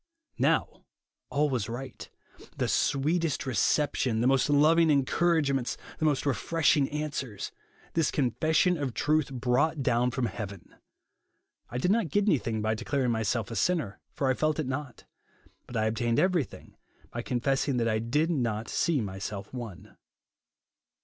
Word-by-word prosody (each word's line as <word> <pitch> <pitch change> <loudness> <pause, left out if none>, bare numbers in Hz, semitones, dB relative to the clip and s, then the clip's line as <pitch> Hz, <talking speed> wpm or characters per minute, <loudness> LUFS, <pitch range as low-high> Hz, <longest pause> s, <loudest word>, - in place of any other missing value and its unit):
Now, - - +1 0.5
all 150 +1 +2
was 115 -4 -1
right; 130 +2 -7 0.5
the - - 0
sweetest 150 +2 +1
re 130 - -2
ception, 130 +1 +1
the - - +1
most 135 +2 +3
loving 160 +3 +5
encouragements, 140 -2 +2 0.2
the 155 - 0
most 145 -3 +1
refreshing 145 0 +2
answers, 145 -8 -4 0.4
this 165 -2 +2
confession 155 +6 +2
of 140 - 0
the 125 - -7
truth 150 -1 +1
brought 130 +4 +1
down 125 -1 +2
from 125 0 -1
heaven. 100 -5 -7 0.9
I 125 - -4
did 180 +9 +1
not 215 -6 +1
get 205 +8 +1
anything 115 - +1
by 110 0 +1
declaring 130 +3 -1
myself 110 0 -1
a - - -4
sinner, 125 - 0
for 140 - -1
I 130 - +3
felt 155 +3 0
it 155 - -1
not; 130 0 -5 0.6
but 120 - -5
I 110 - +1
obtained 115 +1 0
everything 180 -7 0 0.4
by 120 - -4
confessing 135 +2 0
that 115 -1 +1
I 110 -1 +1
did 150 +9 +1
not 115 -7 -1
sea 160 -6 +1
myself 100 +1 -6
one." 115 -8 -8
135 Hz, 150 wpm, -28 LUFS, 115-150 Hz, 0.9 s, loving